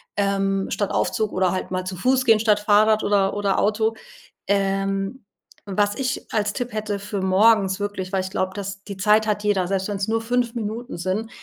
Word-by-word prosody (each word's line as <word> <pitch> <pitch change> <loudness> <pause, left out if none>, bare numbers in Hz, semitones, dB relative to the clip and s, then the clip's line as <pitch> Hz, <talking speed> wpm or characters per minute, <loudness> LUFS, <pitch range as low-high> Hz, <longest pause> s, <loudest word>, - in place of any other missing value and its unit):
ähm, 195 -1 0
statt 205 - -1
Aufzug 215 -1 0
oder 185 -1 +1
halt 185 - -4
mal 185 0 -2
zu 185 - -4
Fuß 255 +7 +1
gehen 225 -3 +5
statt 210 -1 +3
Fahrrad 215 +1 +3
oder 200 -1 +2
oder 200 -1 0
Auto. 220 +2 +1 0.5
Ähm, 195 +3 -1 0.5
was 205 +1 +1
ich 265 +3 -3
als 210 -2 0
Tipp 245 0 -4
hätte 215 -1 -2
für 200 0 -4
morgens 190 0 +3
wirklich, 205 -2 -4
weil 190 - +1
ich 190 - -6
glaube, 185 0 -1
dass 200 0 -6
die 200 -2 -8
Zeit 215 +2 +3
hat 210 -1 -1
jeder, 200 -3 +1
selbst 190 +1 -1
wenn's 200 -1 -2
nur 225 +1 0
5 240 +1 -1
Minuten 225 -1 -4
sind, 190 +6 -2
205 Hz, 195 wpm, -23 LUFS, 195-220 Hz, 0.5 s, gehen